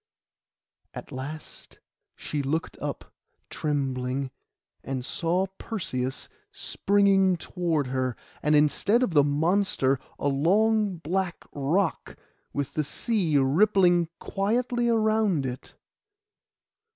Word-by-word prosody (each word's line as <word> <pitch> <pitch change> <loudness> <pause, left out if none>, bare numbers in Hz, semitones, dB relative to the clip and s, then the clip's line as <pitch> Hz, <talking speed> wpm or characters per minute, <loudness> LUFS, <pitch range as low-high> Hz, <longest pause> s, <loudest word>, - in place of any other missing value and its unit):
At - - -8
last 145 +4 -8 0.4
she 150 - -3
looked 155 +4 -2
up - - -5 0.4
trembling, 135 -2 -2 0.5
and 130 -2 -4
saw 175 +5 0
Perseus 135 - -3 0.2
springing 195 -2 +2
toward 165 -4 -1
her; 130 -1 -1 0.3
and 150 0 +3
instead 200 - +3
of 195 - 0
the 145 -2 +6
monster 145 -2 +2 0.2
a - - -1
long 200 +7 +2
black 175 +2 -2
rock, 160 +6 -1 0.3
with 140 0 -3
the 155 - 0
sea 170 +1 0
rippling 175 +4 +4
quietly 240 +4 0
round 215 - +2
it. 125 0 -6
165 Hz, 100 wpm, -26 LUFS, 140-200 Hz, 0.5 s, the